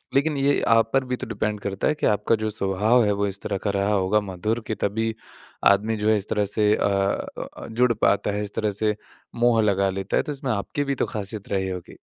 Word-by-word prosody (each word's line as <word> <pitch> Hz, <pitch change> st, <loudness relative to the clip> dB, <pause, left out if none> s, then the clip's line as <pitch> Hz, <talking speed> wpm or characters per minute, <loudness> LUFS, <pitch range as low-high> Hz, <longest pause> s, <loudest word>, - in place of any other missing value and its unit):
लेकिन 145 Hz, +1 st, +2 dB
ये 140 Hz, +1 st, +2 dB
आप 115 Hz, 0 st, +4 dB
पर 135 Hz, 0 st, +3 dB
भी 125 Hz, 0 st, -2 dB
तो -, -, -7 dB
डिपेंड 105 Hz, -1 st, -2 dB
करता 100 Hz, -1 st, -2 dB
है 150 Hz, -, +2 dB
कि -, -, -2 dB
आपका 105 Hz, +2 st, +2 dB
जो 110 Hz, 0 st, -2 dB
स्वभाव 105 Hz, +4 st, +2 dB
है, 105 Hz, -, +2 dB
वो 100 Hz, 0 st, 0 dB
इस 100 Hz, 0 st, -6 dB
तरह 100 Hz, -2 st, -2 dB
का -, -, +2 dB
रहा 100 Hz, +1 st, 0 dB
होगा 100 Hz, +2 st, +2 dB
मधुर 105 Hz, +4 st, -2 dB
के 110 Hz, -, -2 dB
तभी 110 Hz, +3 st, -1 dB, 0.5 s
आदमी 105 Hz, +3 st, +3 dB
जो 105 Hz, +1 st, +1 dB
है 110 Hz, -, +5 dB
इस 100 Hz, -, -5 dB
तरह 105 Hz, -1 st, +1 dB
से 105 Hz, +1 st, +2 dB
अ -, -, 0 dB, 0.7 s
अ, -, -, -8 dB
जुड़ 120 Hz, +1 st, +2 dB
पाता 105 Hz, -1 st, +1 dB
है, 105 Hz, +1 st, -2 dB
इस 105 Hz, -1 st, -5 dB
तरह 105 Hz, -1 st, 0 dB
से 105 Hz, -1 st, +2 dB, 0.4 s
मोह 120 Hz, -1 st, +3 dB
लगा 100 Hz, -2 st, +2 dB
लेता 95 Hz, +1 st, -2 dB
है, -, -, +2 dB
तो 150 Hz, -, -4 dB
इसमें 135 Hz, -3 st, -3 dB
आपकी 110 Hz, +7 st, -2 dB
भी 140 Hz, -1 st, -1 dB
तो -, -, 0 dB
खासियत 105 Hz, 0 st, -5 dB
रही 95 Hz, -1 st, -1 dB
होगी। 90 Hz, -2 st, -7 dB
105 Hz, 245 wpm, -24 LUFS, 100-115 Hz, 0.7 s, है